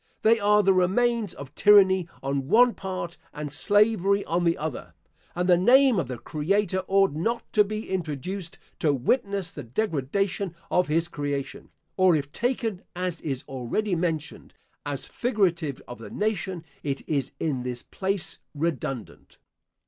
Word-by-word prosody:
They 225 +1 +5
are 210 0 +4
the 195 - +5
remains 210 +3 +1
of 140 0 -10
tyranny 190 -3 +5
on 135 0 -2
one 240 - +5
part 185 -3 -5
and 150 -1 -5
slavery 205 +2 +3
on 175 +1 0
the 170 0 +2
other; 155 -3 -5 0.4
and 180 +1 0
the 175 -2 +5
name 255 +2 +5
of 170 - -2
the 125 -1 -5
Creator 190 - 0
ought 195 -2 +4
not 225 +11 -1
to 210 - +6
be 215 +2 -5
introduced 175 +1 -4 0.2
to 150 -3 +2
witness 200 - 0
the - - -7
degradation 180 - -1 0.2
of 180 - +3
his 165 +2 +1
creation; 145 -4 -4 0.3
or 185 -3 +5
if 145 -2 -2
taken, 230 - -1
as 180 -2 -3
is 135 -4 -3
already 135 - -2
mentioned, 165 -2 -3 0.3
as 145 -2 -3
figurative 180 - 0
of 120 -1 -9
the 115 - -9
nation, 195 -5 -2 0.2
it 140 -1 -4
is 140 -4 -1
in 140 -6 -1
this 125 -1 -5
place 195 -1 -3 0.2
redundant. 140 -6 -4
180 Hz, 150 wpm, -26 LUFS, 150-205 Hz, 0.4 s, to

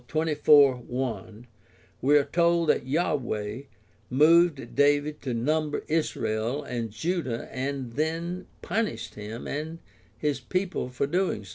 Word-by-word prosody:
24:1 135 -7 +2 0.6
we 145 +3 +5
are 145 - +4
told 170 +1 +2
that 130 - +2
Yahweh 130 -8 -1 0.5
moved 155 -1 +4
David 145 +1 +2
to 130 - -3
number 150 +6 0
Israel 135 -4 -1
and 120 -4 -4
Judah 130 - -2
and 130 -2 -3
then 165 +5 -2 0.2
punished 200 - -2
him 105 +3 -7
and 155 +3 -4 0.4
his 145 -2 -1
people 185 +1 -2
for 125 +2 -1
so 140 - -8
doing. 175 - 0
145 Hz, 120 wpm, -27 LUFS, 125-160 Hz, 0.6 s, we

